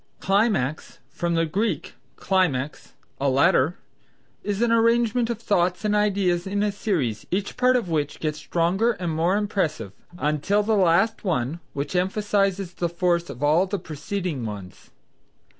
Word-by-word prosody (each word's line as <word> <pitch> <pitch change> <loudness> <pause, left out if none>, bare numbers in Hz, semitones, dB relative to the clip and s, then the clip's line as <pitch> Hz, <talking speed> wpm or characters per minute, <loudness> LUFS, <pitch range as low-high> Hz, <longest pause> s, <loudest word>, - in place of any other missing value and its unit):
Climax 195 - 0
(from 170 -1 -1
the 165 0 +2
Greek, 205 +8 -2 0.2
klimax, 150 -8 -1 0.3
a 140 0 +2
ladder), 150 +3 +3 0.7
is 205 +2 -1
an 235 - +2
arrangement 230 +1 +3
of 235 - -1
thoughts 180 -3 0
and 210 0 +2
ideas 195 -4 +1
in 200 +1 0
a 210 - +1
series, 165 - -2
each 195 +2 -2
part 255 0 +3
of 240 -7 0
which 150 -4 -2
gets 155 -1 -2
stronger 190 +8 +1
and 180 -5 -3
more 170 +5 +2
impressive 165 - -2 0.2
until 155 +7 +1
the 220 +2 +1
last 195 +4 +3
one, 160 - -1
which 140 +5 -4
emphasizes 195 0 0
the 175 -1 -2
force 170 0 0
of 125 - -7
all 160 +6 +3
the 200 +2 -2
preceding 165 -2 -4
ones. 100 -4 -8
180 Hz, 150 wpm, -24 LUFS, 155-205 Hz, 0.7 s, ladder